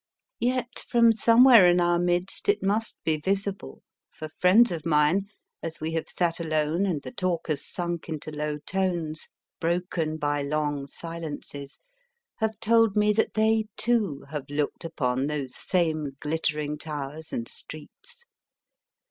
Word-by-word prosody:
Yet, 245 0 -1
from 235 -1 +5
somewhere 230 -3 +7
in 175 0 +4
our 175 0 +3
midst, 175 - 0
it 410 - +2
must 210 +3 0
be 155 -1 +1
visible 195 +4 -3 0.3
for 155 - -8
friends 185 +9 +4
of 165 -3 -4
mine, 165 +5 +2 0.3
as 165 0 -6
we 155 +1 -3
have 165 - -2
sat 170 -2 0
alone, 160 +3 0
and 155 -7 -2
the - - -7
talk 185 -8 -2
has 150 -2 -1
sunk 175 -2 -4
into 155 -1 -5
low 150 0 -3
tones, 170 -2 -2 0.3
broken 170 -2 -1
by 145 -1 0
long 145 -1 -1
silences, 150 -3 -7 0.6
have 220 -1 -2
told 225 -1 +3
me 210 0 +4
that 220 - 0
they, 220 0 +3
too, 215 -12 0
have 150 -3 -5
looked 145 +4 -2
upon 135 -5 -1
those 140 -4 -4
same 155 -6 -1
glittering 150 -1 -2
towers 150 0 -6
and 115 - -3
streets. 475 - -9
165 Hz, 145 wpm, -26 LUFS, 150-200 Hz, 0.6 s, somewhere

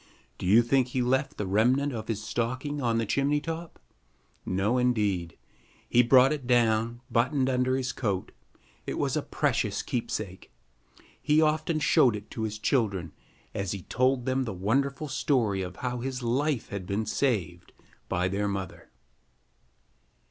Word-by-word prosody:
Do - - -3
you 110 +5 +6
think 130 +1 +2
he 125 0 -1
left 130 +4 0
the 105 - -2
remnant 125 +9 +2
of 110 -2 -5
his 110 -2 -3
stocking 130 +6 -2
on 115 -2 +1
the 115 - 0
chimney 140 +6 +1
top? 165 +2 -6 0.7
No, 100 +7 +1
indeed. 105 -9 0 0.5
He 120 - +5
brought 130 +3 +6
it 140 -5 -6
down, 115 -1 +2
buttoned 130 +3 +2
under 130 0 +1
his 130 -1 -2
coat. 100 -6 -2 0.6
It - - -3
was - - 0
a - - +1
precious - - -1
keepsake. 110 - -4 0.7
He 150 +1 +3
often 155 +1 +2
showed 150 -6 +4
it 105 +1 -9
to 110 - -5
his 110 -1 -2
children, 100 - 0 0.4
as 100 -1 -2
he 100 -3 -6
told 130 0 +1
them 130 0 0
the 110 - -4
wonderful 135 +10 0
story 125 - +1
of 90 -1 -5
how 125 0 -2
his 130 0 -4
life 130 +2 0
had 100 -3 -5
been 100 +3 -1
saved 95 - -1 0.4
by 90 +1 +1
their 100 +2 -1
mother. 100 -2 -5
120 Hz, 155 wpm, -28 LUFS, 105-135 Hz, 0.7 s, you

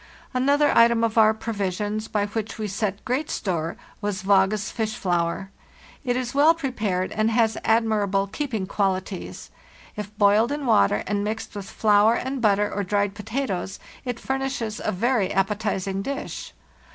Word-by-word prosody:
Another 280 +3 +3
item 230 0 +5
of 225 -1 +1
cur 220 -1 +6
provisions, 210 -1 -3
by 205 -1 0
which 220 +1 -4
we 215 -1 -3
set 205 0 -3
great 270 +5 -1
store, 170 -4 -2 0.2
was 205 -2 -2
Vage's 195 +1 +2
fish 220 -1 -2
flour. 175 +1 -1 0.5
It 245 -2 0
is 250 -2 -3
well 300 +4 +5
prepared 215 - -2
and 215 +1 +1
has 225 -1 +2
admirable 215 -3 +2
keeping 225 -2 -3
qualities; 190 -1 -3 0.4
if 210 0 -7
boiled 210 +4 +4
in 290 -1 -3
water 105 - +3
and 205 +1 -1
mixed 220 +2 -4
with 200 -1 -6
flour 215 +1 +4
and 260 0 -3
butter 205 -1 +2
or 205 - -1
dried 200 +1 0
potatoes, 210 -4 -3 0.3
it 245 -2 -4
furnishes 265 -5 -3
a - - 0
very 225 0 +1
appetizing 195 -1 -1
dish. 275 +6 -5
215 Hz, 150 wpm, -24 LUFS, 195-235 Hz, 0.5 s, cur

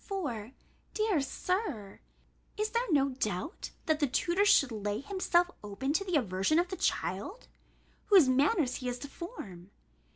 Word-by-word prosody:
For, 265 - -4 0.4
dear 430 -8 +2
Sir, 280 - -3 0.6
is 425 +1 -1
there 470 -3 0
no 280 -2 +4
doubt, 255 - -3 0.2
that 315 -1 +1
the 290 - +2
tutor 345 +9 +1
should 280 -10 +5
lay 210 -1 -2
himself 355 +1 +1
open 210 +8 -3
to 360 - +1
the 365 -3 -2
aversion 195 - +1
of 350 +1 +2
the 375 - -3
child, 220 - -2 0.6
whose 380 -9 +7
manners 275 - +2
he 250 - -3
is 245 - -3
to 285 - -7
form? 205 - -9
290 Hz, 155 wpm, -31 LUFS, 230-375 Hz, 0.6 s, whose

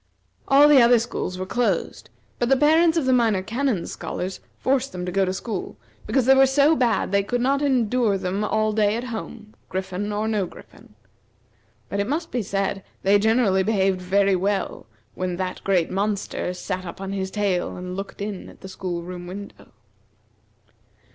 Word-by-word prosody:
All 280 +2 +7
the 290 -3 +7
other 240 +1 +6
schools 225 -5 -3
were 185 - -3
closed, 240 +5 -1 0.3
but 240 - +1
the 270 - +5
parents 320 +4 +4
of 315 - +1
the 260 - +3
Minor 225 -6 +2
Canon's 230 -4 -1
scholars 185 +1 -5 0.2
forced 270 0 0
them 180 -1 -4
to 180 - -3
go 195 +1 +2
to 185 - -1
school, 195 0 -5 0.3
because 265 -3 +2
they 265 - +7
were 270 0 +6
so 285 +4 +4
bad 240 -8 +1
they 200 0 +3
could 245 +5 -2
not 275 +3 +1
endure 245 -6 +2
them 190 +2 -2
all 215 0 +1
day 210 0 +2
at 235 - -3
home, 220 -1 -8 0.2
griffin 190 +2 -3
or 210 +1 -1
no 210 -4 0
griffin. - - -16 0.9
But 200 - -3
it 200 - 0
must 320 +4 -2
be 245 - -1
said 195 -1 -2 0.2
they 200 +1 +4
generally 220 -3 +3
behaved 190 -2 +1
very 195 +1 +2
well 195 - -2 0.3
when 185 -1 -3
that 185 0 -4
great 185 -4 +1
monster 200 -1 -2
sat 185 +1 -4
up 170 0 -8
on 195 0 -5
his 190 -1 -2
tail 195 -3 -1
and 180 0 -6
looked 195 +1 -6
in 205 -2 -6
at - - -17
the 190 - -9
school 180 -3 -4
room 175 0 -8
window. 200 +3 -10
205 Hz, 185 wpm, -23 LUFS, 190-245 Hz, 0.9 s, All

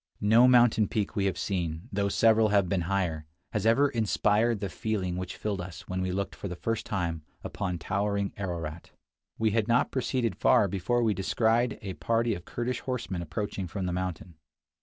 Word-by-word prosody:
No 115 +4 +6
mountain 120 -4 +5
peak 105 -2 -2
we 100 - +1
have 95 - 0
seen, 85 -1 -3
though 100 0 +1
several 110 +1 +4
have 100 -3 +3
been 90 -1 -1
higher, 85 -6 -1 0.3
has 105 0 0
ever 135 +6 +5
inspired 110 -1 +1
the 100 - -2
feeling 95 -2 -2
which 90 0 -5
filled 100 -4 -2
us 85 -3 -9
when 95 0 -2
we 95 0 -1
looked 100 +1 -2
for - - -6
the 90 - -5
first 115 +5 -3
II 100 - -2
49 - - 0
time 85 -3 -2 0.2
upon 90 -4 -3
towering 100 +3 -1
Ararat. 85 -4 -5 0.5
We 110 -1 +2
had 110 0 +1
not 120 +1 +2
proceeded 125 -2 -1
far 100 - +4
before 110 +6 0
we 110 -2 +2
descried 110 +4 +1
a 95 -1 -4
party 115 +3 0
of 85 -4 -7
Kurdish 120 +1 -3
horsemen 115 -9 -3
approaching 95 +3 -4
from 95 +2 -4
the 90 - -1
mountain. 90 -2 -4
100 Hz, 195 wpm, -28 LUFS, 90-115 Hz, 0.5 s, No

